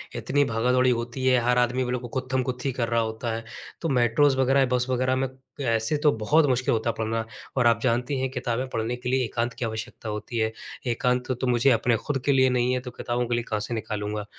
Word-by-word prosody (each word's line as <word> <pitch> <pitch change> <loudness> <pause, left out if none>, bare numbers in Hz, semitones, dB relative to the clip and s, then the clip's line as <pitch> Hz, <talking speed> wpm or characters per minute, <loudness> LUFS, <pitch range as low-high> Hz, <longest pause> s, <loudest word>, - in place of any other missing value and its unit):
इतनी 145 0 +1
भागा-दौड़ी 125 +2 +2
होती 120 +2 -3
है, 130 -1 +5
हर 125 +1 +2
आदमी 125 +1 +2
को 125 -1 -3
गुत्थम-गुत्थी 130 +1 -2
कर 120 -2 -2
रहा 115 0 +2
होता 110 +1 -3
है। 115 - -5 0.4
तो 165 - -1
मेट्रोज़ 130 +2 +3
वग़ैरह, 135 +1 +4
बस 125 0 +2
वग़ैरह 130 +1 +1
में 135 0 0 0.4
ऐसे 115 +6 +1
तो 150 - +6
बहुत 150 +9 +3
मुश्किल 130 -1 +1
होता 115 +1 0
है - - 0
पढ़ना। 115 0 -1 0.3
और 120 -1 +4
आप 115 -1 +4
जानती 125 +3 0
हैं 130 0 -1
किताबें 125 0 -2
पढ़ने 115 +1 -2
के 125 0 -5
लिए 130 0 +2
एकांत 120 +1 -2
की 120 - -3
आवश्यकता 110 0 -5
होती 105 +3 -4
है। 110 0 +1 0.4
एकांत 125 +2 0
तो 130 - 0
मुझे 125 +2 +4
अपने 115 0 +2
खुद 140 -2 -1
के 140 - +4
लिए 130 -1 +4
नहीं 125 0 +1
है 125 - +1
तो 125 -1 -8
किताबों 120 0 -2
के 120 - 0
लिए 120 - -1
कहाँ 105 -1 0
से 120 - -4
निकालूँगा। 105 -1 -3
125 Hz, 225 wpm, -25 LUFS, 115-130 Hz, 0.4 s, तो